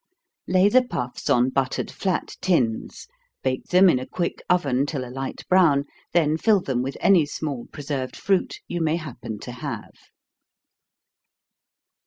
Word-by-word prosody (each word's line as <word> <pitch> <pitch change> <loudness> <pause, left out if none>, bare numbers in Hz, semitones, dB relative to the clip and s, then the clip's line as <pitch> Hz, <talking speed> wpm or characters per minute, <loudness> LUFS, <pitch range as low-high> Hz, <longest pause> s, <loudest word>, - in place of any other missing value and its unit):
Lay 185 +2 +4
the 255 +5 +5
puffs 125 - -4
on 125 +2 +3
buttered 135 -1 -1
flat 190 -3 -2
tins 125 -12 0 0.4
bake 130 -1 -1
them 185 +2 +5
in 150 -8 +4
a 130 - -7
quick 175 -2 -3
oven 140 -6 +2
till 140 -4 -3
a 125 - -9
light 135 0 -6
brown, 160 -7 +4 0.3
then 160 -2 +2
fill 215 0 +4
them 130 -8 -1
with 135 +2 -4
any 190 -5 +5
small 145 -4 -4
preserved 140 -3 -4
fruit 195 -2 0
you 175 - -3
may 160 0 +2
happen 120 -9 -6
to 125 - -7
have. 125 - -6
145 Hz, 150 wpm, -24 LUFS, 130-180 Hz, 0.4 s, the